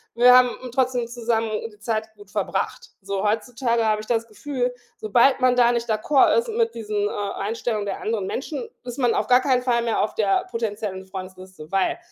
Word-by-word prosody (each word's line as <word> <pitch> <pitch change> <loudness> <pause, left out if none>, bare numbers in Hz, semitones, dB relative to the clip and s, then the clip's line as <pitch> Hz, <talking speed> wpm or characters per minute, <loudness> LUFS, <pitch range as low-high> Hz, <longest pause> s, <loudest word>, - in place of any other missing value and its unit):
Wir 245 +1 +7
haben 250 -1 +5 0.2
trotzdem 255 -2 +1
zusammen 230 -1 -1 0.2
die 210 - -20
Zeit 220 0 -3
gut 205 -1 -16
verbracht. 205 -2 -3
So, 200 +1 -2
heutzutage 235 +2 0
habe 215 -1 +2
ich - - -10
das 230 -1 0
Gefühl, 250 +2 -3 0.3
sobald 240 +6 +3
man 255 -1 +4
da 240 -1 +5
nicht 235 -1 -2
d'accord 225 +6 +3
ist 465 0 0
mit 455 0 0
diesen, 210 -2 -1
äh, - - -6 0.2
Einstellungen 215 0 -2
der 195 - -3
anderen 430 -1 -2
Menschen, 460 +2 -4 0.2
ist 245 +1 -6
man 245 -3 +2
auf - - +1
gar 250 0 +5
keinen 255 -2 +2
Fall 240 -2 +2
mehr 230 -1 0
auf 215 - -2
der 200 -3 +1
potenziellen 210 -4 -3
Freundesliste. 185 -3 -9
Weil 195 -1 +1
230 Hz, 195 wpm, -23 LUFS, 210-250 Hz, 0.3 s, Wir